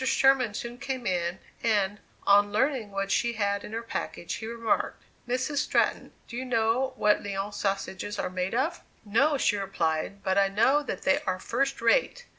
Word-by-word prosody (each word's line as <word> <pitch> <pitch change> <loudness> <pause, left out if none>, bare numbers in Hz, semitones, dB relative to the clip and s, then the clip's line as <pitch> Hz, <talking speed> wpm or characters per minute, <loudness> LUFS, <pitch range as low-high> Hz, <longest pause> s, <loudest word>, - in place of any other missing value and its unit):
Sherman 260 -4 +3
soon 240 +2 -5
came 265 -3 -4
in, 175 -1 0 0.2
and, 205 -3 +1 0.3
on 205 0 +5
learning 240 0 +1
what 195 0 -3
she 235 +2 +2
had 200 -2 0
in - - -8
her 225 +1 -3
package, 175 -6 -4
he 220 - -5
remarked: 230 -1 -1 0.2
"Mrs. 255 +4 -1
Stratton, - - +1 0.2
do 235 - -8
you 250 - -3
know 245 +2 +1
what 210 -4 +3
Lyons 200 0 -4
sausages 195 0 -2
are - - -2
made 185 +3 -2
of?" 315 +8 0 0.2
"No," 275 +8 +3
she 210 -5 +2
replied; 195 -1 -2
"but 190 +1 +2
I 195 - +4
know 230 +9 +3
that 255 -10 -5
they 190 - +3
are 185 -1 +1
first 270 +8 -1
rate!" - - +2
215 Hz, 180 wpm, -28 LUFS, 195-255 Hz, 0.3 s, on